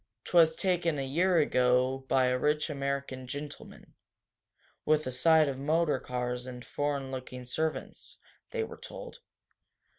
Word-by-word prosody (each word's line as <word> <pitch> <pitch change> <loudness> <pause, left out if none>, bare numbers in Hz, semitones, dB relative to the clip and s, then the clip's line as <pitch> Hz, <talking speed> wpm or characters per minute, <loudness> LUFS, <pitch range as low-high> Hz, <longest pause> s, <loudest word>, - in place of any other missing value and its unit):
"'Twas 165 -2 +5
taken 175 -4 0
a 135 - -2
year 175 +7 +2
ago 130 -3 +3
by 130 -1 +3
a 125 0 +2
rich 150 +3 +1
American 140 -2 -3
gentleman, 145 +3 -8 0.9
with 155 0 +2
a 130 - -2
sight 155 +4 +4
of 135 -1 -3
motor 150 0 +1
cars 125 0 -3
and 125 -1 -8
foreign 140 -2 -2
looking 130 -1 -7
servants," 155 +6 -4 0.3
they 465 -2 -2
were - - -8
told. - - -9
140 Hz, 140 wpm, -30 LUFS, 130-160 Hz, 0.9 s, Twas